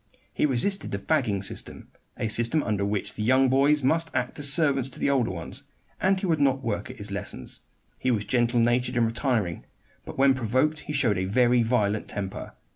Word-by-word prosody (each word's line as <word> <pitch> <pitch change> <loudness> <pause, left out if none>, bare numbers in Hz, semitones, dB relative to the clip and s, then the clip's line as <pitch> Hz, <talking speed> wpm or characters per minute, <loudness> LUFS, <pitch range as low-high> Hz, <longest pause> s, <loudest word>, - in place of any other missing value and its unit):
He - - +2
resisted 170 +10 0
the 100 - -2
"fagging" 105 -4 0
system, - - -6 0.3
a - - -1
system 120 +7 0
under 105 -2 -1
which 100 0 -2
the - - -6
young 130 +4 +4
boys 140 +2 +3
must 165 +5 +1
act 125 +4 -2
as 140 -1 +3
servants 140 -4 +1
to - - -12
the 140 - +1
older 130 -6 +1
ones, 85 -2 -7 0.4
and 190 0 +2
he 195 - -3
would 165 -4 +1
not 135 -1 +2
work 105 -3 -3
at - - -9
his 100 0 -5
lessons. 100 - -6 0.4
He 130 - 0
was 105 -4 0
gentle 120 -1 +1
natured 120 +2 +1
and 120 - +4
retiring; 115 - -1 0.4
but - - -9
when 135 0 +5
provoked 130 +5 0
he 150 - -6
showed 110 -9 +1
a 95 - -1
very 120 +4 +3
violent 110 -3 0
temper. 95 -1 -6
125 Hz, 200 wpm, -26 LUFS, 105-140 Hz, 0.4 s, when